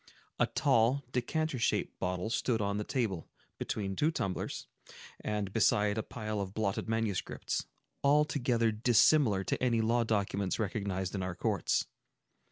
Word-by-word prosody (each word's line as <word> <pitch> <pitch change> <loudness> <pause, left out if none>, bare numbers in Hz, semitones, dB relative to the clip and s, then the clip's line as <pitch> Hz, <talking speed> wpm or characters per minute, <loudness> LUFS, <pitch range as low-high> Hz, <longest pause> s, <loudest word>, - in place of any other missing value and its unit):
A - - +4
tall, 120 +5 +2
decanter 140 +3 -1
shaped - - 0
bottle 90 +4 -2
stood 115 -1 +1
on 100 -1 0
the - - -1
table, 110 - -2 0.3
between 95 -2 -2
two 150 +10 +2
tumblers, 100 - -3 0.5
and 105 -2 -3
beside 105 -2 +3
a 110 - 0
pile 110 -2 -4
of 95 0 -5
blotted 110 0 -1
manuscripts, 110 -4 -2 0.4
altogether 140 -5 +3
dissimilar 110 -1 +4
to - - -2
any 120 -3 +2
law 115 +2 +2
documents 100 -3 0
recognized 100 -3 -2
in 95 - -2
our 90 -1 -3
courts. - - 0
110 Hz, 140 wpm, -32 LUFS, 100-120 Hz, 0.5 s, A